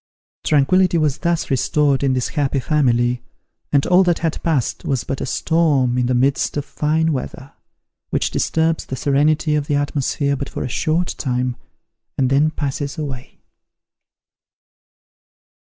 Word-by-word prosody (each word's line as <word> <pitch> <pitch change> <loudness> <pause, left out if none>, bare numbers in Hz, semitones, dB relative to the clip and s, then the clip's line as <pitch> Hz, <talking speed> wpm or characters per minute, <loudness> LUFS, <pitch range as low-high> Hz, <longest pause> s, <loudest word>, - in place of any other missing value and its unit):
Tranquillity 170 +5 +3
was 150 -3 0
thus 170 -4 -1
restored 140 +1 +2
in 135 -2 +2
this 125 -1 -1
happy 140 -2 0
family, 125 -4 +1 0.5
and 140 -1 +3
all 180 +1 +5
that 175 -2 +2
had 165 -2 -2
passed 150 -8 -1
was 135 -4 -1
but 135 - -4
a - - -3
storm 145 -5 +1
in 125 -1 +1
the 125 - +1
midst 135 +4 +1
of 145 - -2
fine 160 +1 0
weather, 135 0 -6 0.6
which - - 0
disturbs 160 0 0
the 130 - -4
serenity 150 +3 +1
of 150 -1 0
the 145 - +1
atmosphere 145 0 0
but 140 0 -5
for - - -5
a - - -2
short 160 +7 0
time, 125 -2 -1 0.6
and 130 -1 +1
then 145 +3 +4
passes 145 0 -4
away. 135 -5 -7
145 Hz, 150 wpm, -20 LUFS, 130-155 Hz, 0.6 s, all